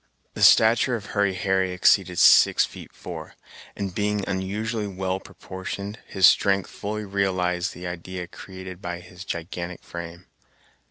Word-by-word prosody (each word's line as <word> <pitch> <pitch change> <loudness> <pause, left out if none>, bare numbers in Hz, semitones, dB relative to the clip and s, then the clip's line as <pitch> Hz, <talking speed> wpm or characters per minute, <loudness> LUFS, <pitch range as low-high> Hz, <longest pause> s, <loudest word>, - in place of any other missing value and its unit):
The - - -7
stature 115 +2 +6
of 105 -3 -6
Hurry 100 -2 +1
Harry 95 0 0
exceeded 90 - +3
six - - +6
feet - - -11
four, - - -9 0.4
and 100 -2 -4
being 105 +1 -1
unusually 105 +3 -2
well 95 -1 -3
proportioned, 100 +3 -7
his 95 -2 +3
strength 95 -1 +4
fully 105 +1 -5
realized 95 -3 -1
the 90 - -8
idea 90 +1 -5
created 95 +1 -10
by 90 -2 -5
his 90 +1 -11
gigantic 85 -1 -5
frame. 85 +1 -8
95 Hz, 140 wpm, -24 LUFS, 90-100 Hz, 0.4 s, stature